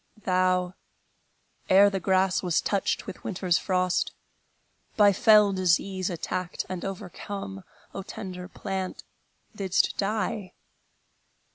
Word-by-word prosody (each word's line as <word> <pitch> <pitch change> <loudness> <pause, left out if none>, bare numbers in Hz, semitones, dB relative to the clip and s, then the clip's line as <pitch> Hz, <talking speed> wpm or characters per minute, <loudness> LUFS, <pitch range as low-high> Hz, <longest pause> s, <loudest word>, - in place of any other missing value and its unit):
Thou, 185 -1 +1 1.0
ere 200 +2 +7
the 195 - -1
grass 190 +1 +2
was 175 -3 +1
touched 200 -2 -1
with - - -9
winter's 180 -2 0
frost, 185 -1 0 0.8
By 205 -2 +6
fell 210 0 +5
disease 185 +1 +1
attacked 180 +1 -3
and 185 -2 -5
overcome, 195 0 -6 0.3
O 195 - -4
tender 185 -3 -7
plant, 190 -1 -5 0.5
didst 190 -3 +1
die! 210 -1 -2
190 Hz, 105 wpm, -27 LUFS, 185-200 Hz, 1.0 s, ere